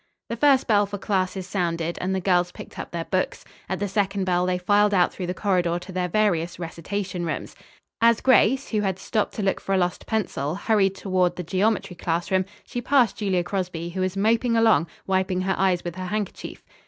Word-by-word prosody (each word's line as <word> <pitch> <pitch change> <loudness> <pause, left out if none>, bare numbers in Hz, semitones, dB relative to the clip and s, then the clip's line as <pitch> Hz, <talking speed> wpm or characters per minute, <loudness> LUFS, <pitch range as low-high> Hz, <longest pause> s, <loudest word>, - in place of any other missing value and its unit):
The 230 - -2
first 270 +1 +4
bell 205 -3 +3
for 205 +1 -5
classes 190 -2 -1
sounded 170 -3 -2
and 190 +1 -1
the - - 0
girls 180 -1 +2
picked - - -11
up - - -5
their 170 -1 -4
books. 185 -1 -2 0.2
At 190 - -1
the 205 - -2
second 195 0 0
bell 180 -1 +1
they 180 0 +1
filed 205 +3 +3
out 180 -1 +3
through 180 - -5
the 180 - -3
corridor 180 -4 +1
to 180 +2 -9
their 180 -1 -1
various 175 -4 +1
recitation 180 +2 -4
rooms. 165 -2 -4 0.5
As 230 0 +5
Grace, 260 +1 +3
who 215 -2 0
had 190 -3 -1
stopped 215 +2 -2
to 210 - -3
look 195 - 0
for 195 - 0
a - - +3
lost 180 -1 -1
pencil, 170 -9 -1
hurried 195 -2 +2
toward 185 -2 0
the 180 - -5
geometry 190 +2 0
classroom, 175 +3 0 0.2
she 245 - -4
passed 250 -3 +3
Julia 190 -4 0
Crosby, 175 -3 -3
who 185 +2 -4
was 185 +1 -1
moping 230 +3 +2
along, 225 -6 +4 0.2
wiping 190 -1 0
her 190 +1 0
eyes 185 -2 +1
with 175 - -4
her 185 0 -4
handkerchief. 210 0 -4
190 Hz, 205 wpm, -24 LUFS, 180-205 Hz, 0.5 s, As